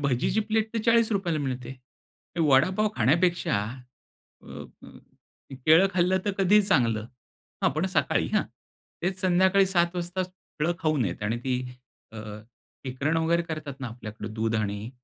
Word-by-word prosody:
भजीची 140 - +1
plate 220 +1 -1
तर - - +1
₹40 220 -6 +2
ला 155 - 0
मिळते. 130 -2 -4 0.6
वडापाव 165 +8 +3
खाण्यापेक्षा 170 +9 +2 0.9
अ, - - -19 0.4
अ, - - -12 0.6
ते 135 - -7
केळं 160 +8 +5
खाल्लं 185 +1 +2
तर 205 - 0
कधीही 205 +2 +5
चांगलं. 115 - +1 0.6
हां, - - +4
पण 155 +6 -1
सकाळी - - +1
हां. - - +3 0.6
तेच 185 +1 -2
संध्याकाळी 190 +1 +4
7:00 175 -1 +1
वाजता, 175 +1 -2
फळं 175 -3 -4
खाऊ 155 -1 +1
नयेत 100 -4 -2
आणि 115 +3 -1
ती 130 -1 0 0.6
अ, 110 - -8 0.7
शिकरण 140 +5 -1
वगैरे 170 +1 +2
करतात 155 -4 -6
ना 130 - -3
आपल्याकडं 110 -2 -8
दूध 115 +1 -1
आणि 105 +2 -3
160 Hz, 150 wpm, -26 LUFS, 125-185 Hz, 0.9 s, केळं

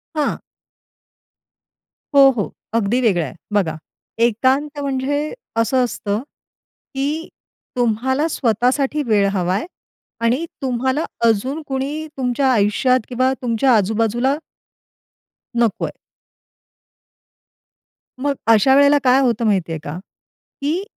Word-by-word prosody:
हां. 300 -2 -1 1.7
हो, 275 -1 +8
हो. 205 - -1 0.2
अगदी 230 +2 +1
वेगळा 190 -9 +2
आहे. 130 - -8 0.2
बघा, 180 -6 +1 0.5
एकांत 265 +6 +1
म्हणजे 285 +2 -2 0.3
असं 255 +3 +2
असतं, 210 -3 -2 0.8
की 295 +4 -2 0.5
तुम्हाला 250 +5 +1
स्वतःसाठी 265 +2 0
वेळ 205 -3 +3
हवा 180 -2 0
आहे 205 - -2 0.6
आणि 250 +8 +1 0.2
तुम्हाला 260 +3 0 0.2
अजून 255 +7 +1
कोणी 280 +4 -3
तुमच्या 260 +1 +1
आयुष्यात 240 +4 +2
किंवा 255 +1 +1
तुमच्या 245 +1 +2
आजूबाजूला 225 +5 +1 1.2
नको 235 -4 +1
आहे. - - -6 2.3
मग 285 +2 0
अशा 230 +4 +5
वेळेला 285 +1 +6
काय 255 0 +5
होतं 235 -3 +1
माहिती 190 -6 +1
आहे 160 - -3
का? 150 +3 -5 0.6
की 315 +7 -1
255 Hz, 105 wpm, -20 LUFS, 220-275 Hz, 2.3 s, हो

